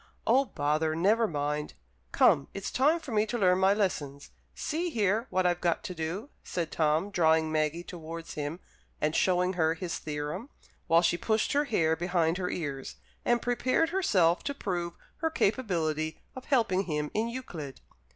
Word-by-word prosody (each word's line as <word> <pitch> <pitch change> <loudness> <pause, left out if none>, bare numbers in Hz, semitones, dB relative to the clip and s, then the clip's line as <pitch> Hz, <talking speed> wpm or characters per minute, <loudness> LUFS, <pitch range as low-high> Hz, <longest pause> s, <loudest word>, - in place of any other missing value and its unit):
"Oh, 265 +4 +4
bother, 155 - 0
never 215 +7 +3
mind! 150 -2 -2 0.4
Come, 140 - +4
it's 195 - -4
time 300 +6 +3
for 305 -6 -9
me 215 0 +2
to 240 - -2
learn 185 -3 +3
my 190 +1 +5
lessons. 145 -9 -2 0.2
See 335 +3 -2
here, 220 - +1
what 185 0 +1
I've 175 0 +1
got 170 -2 +1
to 180 - -5
do," 175 - -4
said 170 -3 -3
Tom, 160 +5 +1
drawing 160 -3 +3
Maggie 155 +2 0
towards 165 -2 -8
him 150 +3 -4 0.4
and 155 +1 0
showing 180 0 +2
her 160 -2 +2
his 170 +1 -4
theorem, 150 - -4 0.4
while 165 +1 +5
she 170 - +2
pushed 220 -1 +1
her 290 +1 +2
hair 165 - +2
behind 175 0 0
her 180 -1 -1
ears, 140 -5 -4 0.3
and 240 -1 +2
prepared 255 +6 +1
herself 185 - +2
to 280 - -2
prove 175 -7 -3 0.2
her 320 - 0
capability 165 - 0 0.2
of 260 - -8
helping 210 -8 +2
him 150 -3 -2
in 220 +2 0
Euclid. 175 - -7
180 Hz, 170 wpm, -29 LUFS, 160-220 Hz, 0.4 s, my